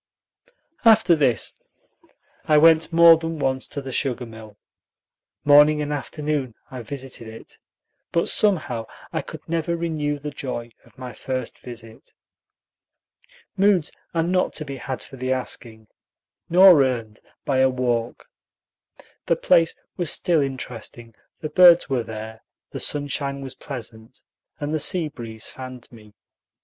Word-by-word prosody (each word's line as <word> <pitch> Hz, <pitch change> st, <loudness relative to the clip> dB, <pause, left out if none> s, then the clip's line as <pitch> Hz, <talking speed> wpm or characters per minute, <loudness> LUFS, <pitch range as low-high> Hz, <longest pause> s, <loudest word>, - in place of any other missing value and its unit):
After 220 Hz, -6 st, +6 dB
this 130 Hz, -9 st, 0 dB, 0.9 s
I 150 Hz, -, +4 dB
went 160 Hz, +1 st, +5 dB
more 165 Hz, 0 st, +8 dB
than 165 Hz, 0 st, -5 dB
once 130 Hz, -2 st, -1 dB
to 140 Hz, -1 st, -6 dB
the 135 Hz, -, -6 dB
sugar 125 Hz, -2 st, -1 dB
mill. 110 Hz, -2 st, -13 dB, 0.9 s
Morning 150 Hz, +1 st, +6 dB
and 150 Hz, 0 st, -2 dB
afternoon 145 Hz, -3 st, -3 dB, 0.2 s
I 130 Hz, -2 st, -6 dB
visited 130 Hz, -1 st, -9 dB
it, 110 Hz, 0 st, -12 dB, 0.5 s
but 170 Hz, -, +1 dB
somehow 155 Hz, -, +1 dB, 0.3 s
I -, -, -1 dB
could -, -, -11 dB
never 170 Hz, +1 st, -1 dB
renew 155 Hz, -3 st, -2 dB
the 145 Hz, +1 st, -6 dB
joy 120 Hz, -4 st, -6 dB
of -, -, -24 dB
my 125 Hz, -1 st, -8 dB
first 130 Hz, +2 st, -5 dB
visit. 115 Hz, -2 st, -12 dB, 1.4 s
Moods 195 Hz, -5 st, +2 dB, 0.2 s
are 165 Hz, -, +2 dB
not 180 Hz, +2 st, 0 dB
to 155 Hz, -, -2 dB
be 140 Hz, -1 st, -6 dB
had 130 Hz, 0 st, -5 dB
for 135 Hz, -, -12 dB
the 130 Hz, +1 st, -3 dB
asking, 115 Hz, -3 st, -5 dB, 0.6 s
nor 180 Hz, -4 st, +7 dB
earned 115 Hz, -4 st, -3 dB, 0.3 s
by 135 Hz, -2 st, +1 dB
a 130 Hz, 0 st, +5 dB
walk. 120 Hz, -2 st, -2 dB, 1.0 s
The -, -, +3 dB
place 165 Hz, -1 st, +3 dB, 0.2 s
was 175 Hz, -4 st, 0 dB
still 170 Hz, -4 st, +2 dB
interesting, 120 Hz, -3 st, -6 dB, 0.3 s
the 155 Hz, -, -4 dB
birds 175 Hz, +1 st, +6 dB
were 130 Hz, -2 st, +1 dB
there, 110 Hz, 0 st, -8 dB, 0.3 s
the -, -, -6 dB
sunshine 140 Hz, -1 st, -2 dB
was 135 Hz, -1 st, -6 dB
pleasant, 115 Hz, -3 st, -9 dB, 0.4 s
and 145 Hz, 0 st, -3 dB
the 155 Hz, -, 0 dB
sea 170 Hz, 0 st, +1 dB
breeze 115 Hz, -5 st, -7 dB
fanned 130 Hz, -2 st, -10 dB
me. 105 Hz, -3 st, -16 dB
135 Hz, 140 wpm, -23 LUFS, 120-155 Hz, 1.4 s, more